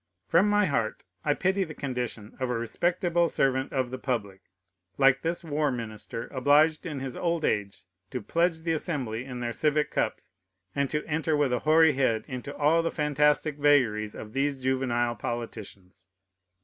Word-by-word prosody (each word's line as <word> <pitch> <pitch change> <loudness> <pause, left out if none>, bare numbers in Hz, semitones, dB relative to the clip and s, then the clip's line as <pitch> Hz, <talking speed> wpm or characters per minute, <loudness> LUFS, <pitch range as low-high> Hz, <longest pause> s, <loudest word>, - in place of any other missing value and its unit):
From 175 - +4
my 205 0 +4
heart 115 - -1 0.2
I 145 -1 +2
pity 190 +1 +1
the 155 -4 -8
condition 125 -5 -4
of 130 -1 -1
a 125 - 0
respectable 170 +7 +1
servant 135 -1 +1
of 130 -2 -1
the 130 - -5
public, 105 -8 -3 0.6
like 135 -1 +4
this 170 +2 -2
war 150 -2 0
minister, 115 -1 -5
obliged 150 +5 +3
in 145 -4 -5
his 135 -2 -5
old 170 -2 0
age 100 -1 -1 0.3
to 125 - -3
pledge 165 - 0
the 165 0 0
Assembly 130 -8 -3
in 125 -2 -7
their 120 -1 -2
civic 150 +3 +1
cups, - - -2 0.4
and 140 -1 0
to 150 0 -2
enter 155 0 0
with 140 -4 +2
a 125 - +1
hoary 160 0 +5
head 130 -5 +1
into 130 +2 -6
all 155 +3 +4
the 165 - -1
fantastic 150 0 +1
vagaries 120 -8 +3
of 105 - -9
these 135 -1 -1
juvenile 120 -2 0
politicians. 100 -6 -7
135 Hz, 170 wpm, -27 LUFS, 120-155 Hz, 0.6 s, hoary